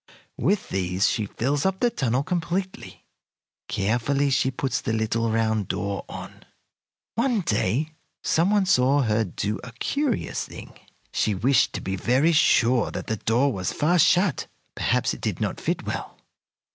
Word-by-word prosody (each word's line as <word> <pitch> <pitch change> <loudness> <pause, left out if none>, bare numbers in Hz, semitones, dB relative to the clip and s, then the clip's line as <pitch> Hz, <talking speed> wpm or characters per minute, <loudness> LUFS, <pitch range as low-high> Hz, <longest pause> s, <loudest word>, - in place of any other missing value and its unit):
With 205 -1 +1
these 95 0 0
she 105 -2 -1
fills 135 +7 -1
up 190 0 0
the 240 - +2
tunnel 130 - 0
completely. 180 +3 -3 0.6
Carefully 125 +7 0
she 130 - +2
puts 135 +1 -2
the 115 - -2
little 110 +1 0
round 110 -3 0
door 100 0 -3
on. - - -9 0.7
One 235 -2 +1
day 125 - 0 0.3
some 170 +4 +2
one 205 -2 +3
saw 140 -4 +3
her 110 -1 +1
do 105 +2 -3
a 125 - -8
curious 270 - -1
thing. - - -10 0.4
She 105 - +1
wished 130 +8 +2
to - - -4
be 95 - -3
very 130 - +3
sure 125 -6 +3
that - - -5
the 110 - -2
door 120 +6 +1
was 95 -2 -2
fast 165 +2 +3
shut. 180 -4 +2 0.3
Perhaps - - 0
it - - -9
did - - -2
not - - -2
fit - - -2
well. - - -5
130 Hz, 160 wpm, -25 LUFS, 110-170 Hz, 0.7 s, one